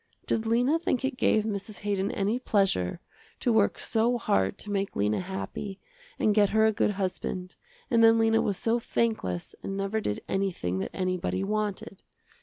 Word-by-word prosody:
Did 225 0 -1
Lena 245 +8 +3
think 270 -6 0
it 265 - -1
gave 220 -3 +3
Mrs. 205 -1 -4
Haydon 200 -1 0
any 205 +5 0
pleasure, 195 - +1 0.4
to 240 - +1
work 215 -2 +3
so 235 +2 +1
hard 95 - +1
to 205 - -7
make 195 -1 -1
Lena 105 +1 +1
happy, 190 +1 -5 0.4
and 215 - +3
get 205 -1 +4
her 220 0 +4
a 220 - +3
good 210 - +1
husband, 185 -1 -3 0.4
and 230 -1 +5
then 225 0 +7
Lena 225 0 +3
was 200 -3 -1
so 230 +1 +1
thankless 220 - -1
and 195 - -4
never 195 +3 -1
did 105 - -3
anything 180 - -1
that - - -3
anybody 185 0 -1
wanted. 205 -1 -3
205 Hz, 175 wpm, -28 LUFS, 190-225 Hz, 0.4 s, then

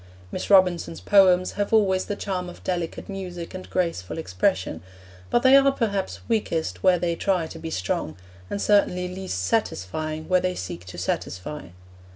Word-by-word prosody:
Miss - - -4
Robinson's 175 - +4
poems 185 - +5
have 205 0 -2
always 195 -4 +3
the 205 - -3
charm 185 -3 -3
of 175 - -13
delicate 175 -3 -3
music 180 -3 -6
and 185 0 -8
graceful 165 - -2
expression; 90 - -1 0.5
but 240 - +2
they 260 +1 +7
are, 275 0 +6
perhaps, 200 -7 -2
weakest 205 -8 -1
where 185 -1 +5
they 170 -1 -1
try 185 -2 0
to 160 +1 -9
be 165 0 -5
strong, 90 - -2 0.3
and - - -3
certainly 190 -3 +2
least 185 - -5
satisfying 155 - -2
where 185 -1 +3
they 185 0 -1
seek 90 -1 -6
to 90 - -9
satisfy. 95 - -4
180 Hz, 165 wpm, -24 LUFS, 155-195 Hz, 0.5 s, they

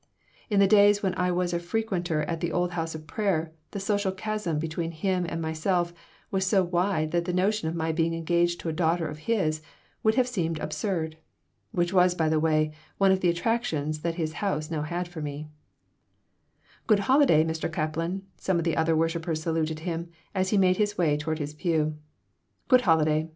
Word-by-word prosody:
In 205 -2 +2
the 200 - +7
days 205 +1 +5
when 190 -2 +1
I 180 0 +1
was 175 0 0
a 170 - +1
frequenter 175 -4 -1
at 165 +2 -3
the 170 0 -2
old 175 +1 0
house 165 -2 -3
of 155 0 -8
prayer 165 -4 -1 0.2
the 200 - -5
social 200 0 0
chasm 190 -4 -2
between 165 +2 -2
him 180 +2 -1
and 165 - -3
myself 170 +2 0 0.4
was 190 -1 +1
so 190 0 +3
wide 175 -3 0
that 170 0 0
the 180 - -1
notion 190 0 +1
of 165 - -4
my 160 -1 0
being 165 +1 0
engaged 170 +1 +1
to 165 - -3
a - - -2
daughter 165 0 +1
of 150 0 -7
his 155 -9 +1 0.4
would 220 0 +3
have 255 -1 +3
seemed 170 -9 -1
absurd. 160 -2 -3 0.5
Which, 175 -3 0
by 180 -3 +3
the 155 0 +2
way, 155 -1 +2
was 155 - -17 0.2
one 195 -1 +4
of 190 - +3
the 180 - +2
attractions 170 -6 -1
that 165 +1 -2
his 160 -2 -2
house 160 -6 -1
now 155 -2 -1
had 175 +4 -3
for 175 -2 -8
me 150 +1 -5 1.4
"Good 210 -3 +4
holiday, 255 - +5
Mr. 160 0 -2
Kaplan!" 165 +4 -2
some 190 -2 0
of 170 - 0
the 165 -1 0
other 160 0 +2
worshipers 165 -1 -1
saluted 160 -1 -1
him, 170 0 -4 0.2
as 185 -1 0
he 210 - +2
made 185 -1 +4
his 210 -1 0
way 155 -5 +3
toward 155 +1 -2
his 150 -1 -4
pew 155 -2 0 0.7
"Good 255 -2 +6
holiday! 160 -5 +2
170 Hz, 200 wpm, -27 LUFS, 160-190 Hz, 1.4 s, the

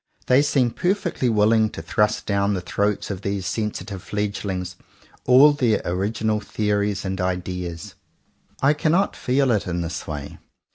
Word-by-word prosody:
They 130 +2 +5
seem 135 -4 +2
perfectly 175 - 0
willing 110 0 +3
to - - -8
thrust 105 0 0
down 100 0 +1
the 90 - -3
throats 100 +3 -1
of 95 -1 -5
these 100 -2 -3
sensitive 105 0 -3
fledgelings 100 -2 -3 0.5
all 135 +4 +7
their 120 -6 +2
original 105 +4 -1
the 105 0 -2
ories 100 -1 0
and 95 0 -2
ideas. 90 -2 -4 0.7
I 140 +2 +5
cannot 165 +6 +1
feel 130 +1 +1
it 105 -4 0
in 85 0 -2
this 80 -2 -5
way. 75 -2 -6
105 Hz, 150 wpm, -23 LUFS, 95-120 Hz, 0.7 s, all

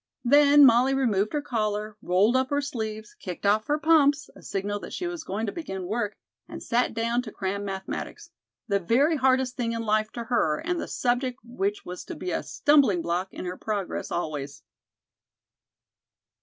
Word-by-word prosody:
Then 290 +2 +7
Molly 255 +2 +5
removed 215 -6 +1
her 295 -1 -1
collar, 215 -5 -2
rolled 195 +7 +3
up 260 0 +2
her 285 - +1
sleeves, 220 -6 -5
kicked 180 +1 -8
off 215 +2 +3
her 295 - +2
pumps 295 -2 +3
a - - -14
signal 205 +1 -3
that - - -9
she 360 - -3
was 350 -2 -4
going 205 +4 -3
to 205 - -3
begin 195 - -5
work 210 +2 -2 0.3
and - - -8
sat 240 -1 0
down 235 +2 0
to 235 -3 -9
cram 200 +1 -3
mathematics, 195 -1 -6 0.4
the 200 -3 +1
very 270 - +2
hardest 260 -1 +2
thing 230 -2 -1
in 230 0 -3
life 215 0 +1
to 235 - -4
her 225 -11 +1
and 350 0 -2
the - - -5
subject 245 +1 -1
which 210 -4 -3
was 180 0 -7
to - - -7
be 180 - -4
a - - -1
stumbling 275 - +3
block 175 +3 -2
in - - -7
her 180 +1 -4
progress 205 -4 -3
always. 145 -4 -4
225 Hz, 185 wpm, -26 LUFS, 200-265 Hz, 0.4 s, Then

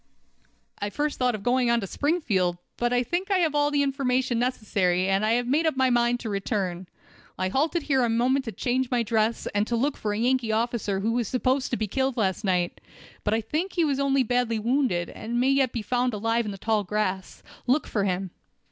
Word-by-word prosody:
"I 205 - -2
first 295 +7 -2
thought 250 -2 +2
of 205 - -8
going 245 +1 +2
on 235 0 +3
to - - -3
Springfield, 200 - 0 0.2
but 240 0 0
I 245 0 +2
think 350 - -2
I 390 - +3
have 330 -4 +1
all 290 0 +2
the 290 -1 +2
information 260 -3 0
necessary, 195 -7 0
and 195 +1 +1
I 220 +1 +2
had 240 +1 0
made 305 +6 +2
up 310 - 0
my 260 -1 +3
mind 240 0 +2
to 225 - -4
return. 195 -3 -2 0.5
I 185 0 -1
halted 310 - 0
here 270 -4 +2
a 235 - +1
moment 255 +4 +1
to 225 - -4
change 255 +2 -1
my 245 -2 +1
dress; 220 0 0
and 205 +1 +1
to 240 - 0
look 275 +5 0
for 210 - -3
a 205 - -2
Yankee 245 0 +1
officer 220 -3 -1
who 220 +3 0
was 235 -2 0
supposed 255 +2 0
to 240 - -1
be 215 - -1
killed 265 +4 -1
last 195 -2 0
night. 180 -3 0 0.4
But 210 - +1
I 225 - 0
think 315 - -3
he 340 -3 +2
was 280 -2 0
only 275 -1 +2
badly 245 -1 0
wounded, 230 -6 0
and 235 +2 -3
may 260 +2 +3
yet 270 -2 +2
be 230 - -4
found 245 0 0
alive 225 +2 0
in 210 - -3
the 195 - -7
tall 215 +1 0
grass. 190 -1 -3 0.2
Look 265 +5 +2
for 205 - -1
him." 185 -1 -1
240 Hz, 230 wpm, -26 LUFS, 210-265 Hz, 0.5 s, on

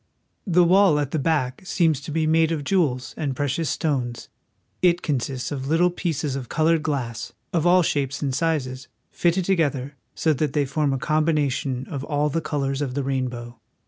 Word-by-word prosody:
The 180 -1 +5
wall 185 -2 +5
at 145 -2 -1
the 160 - 0
back 135 -4 0
seems 165 -6 +1
to 140 - -7
be 160 +1 0
made 160 +1 +3
of 155 -3 -2
jewels 140 -8 0
and 140 -4 -2
pre 145 +2 -1
cious 155 +3 -1
stones. 125 -6 -2 0.5
It 175 -1 +3
consists 130 -3 -2
of 135 -2 -4
little 170 +4 +3
pieces 160 -6 -2
of 130 -3 -5
colored 165 0 +2
glass, 125 -7 -3 0.2
of 170 -1 +2
all 180 0 +5
shapes 140 -3 -1
and 140 -3 -1
sizes, 135 -4 -1 0.2
fitted 175 +1 +1
together 145 -7 0 0.2
so 160 - +2
that 145 -1 -1
they 145 -2 +2
form 145 +1 0
a 135 - 0
combination 145 -4 0
of 140 -3 -5
all 145 0 0
the 165 +3 -1
colors 140 -2 -2
of 130 -3 -2
the 140 - -1
rainbow. 125 -3 -3
145 Hz, 185 wpm, -23 LUFS, 135-165 Hz, 0.5 s, The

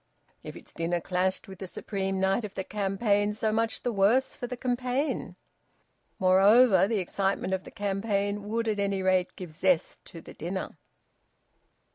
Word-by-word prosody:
If - - -9
its - - -12
dinner 170 +1 -1
clashed 185 +2 -1
with 190 -1 -11
the 190 - -6
supreme 195 0 -3
night 190 +4 +1
of 205 -2 -7
the 190 - -3
campaign, 205 +1 0
so 215 0 0
much 225 +1 -1
the 245 - 0
worse 220 +7 +2
for 245 - -5
the 250 0 -6
campaign! 250 +3 -2 0.8
Moreover, 195 +2 +5
the 225 0 0
excitement 195 0 -1
of 190 0 -2
the - - -9
campaign 205 0 -2
would 230 +2 -1
at 210 -2 0
any 200 -1 0
rate 185 -1 +1
give 180 -4 -8
zest 175 +2 0
to 165 - -10
the - - -12
dinner. 185 +4 -5
195 Hz, 165 wpm, -28 LUFS, 190-220 Hz, 0.8 s, Moreover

